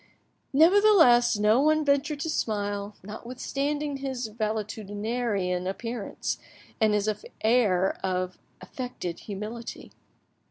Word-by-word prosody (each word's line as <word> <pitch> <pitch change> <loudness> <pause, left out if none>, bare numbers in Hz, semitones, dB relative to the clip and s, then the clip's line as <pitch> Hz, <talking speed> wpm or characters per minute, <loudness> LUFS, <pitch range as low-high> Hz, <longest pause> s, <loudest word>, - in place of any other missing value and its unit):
Nevertheless, 320 - +6
no 210 +4 +4
one 310 +1 +3
ventured 285 +1 +1
to 320 - -2
smile, 205 -3 -2
notwithstanding 275 +7 -3
his 260 -4 -4
valetudinarian 210 -3 -2
appearance 230 +2 -4 0.4
and 215 -2 +3
his 210 0 0 0.4
air 210 -5 +3
of 185 -1 -2 0.2
affected 245 -9 -6
humility. 215 +3 -7
225 Hz, 90 wpm, -27 LUFS, 205-270 Hz, 0.4 s, Nevertheless